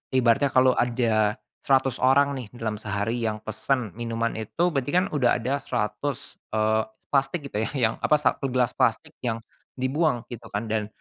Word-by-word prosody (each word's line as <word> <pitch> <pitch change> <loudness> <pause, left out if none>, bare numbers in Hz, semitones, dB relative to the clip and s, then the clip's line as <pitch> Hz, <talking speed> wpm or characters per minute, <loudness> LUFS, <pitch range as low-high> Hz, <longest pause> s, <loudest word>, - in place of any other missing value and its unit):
ibaratnya 130 +3 +4
kalau 130 -1 +4
ada 115 -3 +1 0.2
100 135 -2 +2
orang 140 +2 +4
nih 120 - -7
dalam 110 -3 -3
sehari 105 +3 -2
yang 110 -2 -2
pesen 110 +1 -1
minuman 115 0 -1
itu, 170 - 0
berarti 140 -1 -1
kan 185 +1 +4
udah 130 -5 +3
ada 140 +3 0
100, 135 +5 -3 0.2
eee, 110 0 +2 0.3
plastik 140 +3 +1
gitu 105 - -2
ya - - -5
yang 115 -4 +2
apa, 150 - +3
1 140 -1 +1
gelas 125 -2 +1
plastik - - +1
yang 115 -2 -3 0.3
dibuang 130 -1 0
gitu 115 -1 -8
kan, 110 +1 -4
dan 105 -2 0
120 Hz, 170 wpm, -25 LUFS, 110-135 Hz, 0.3 s, ibaratnya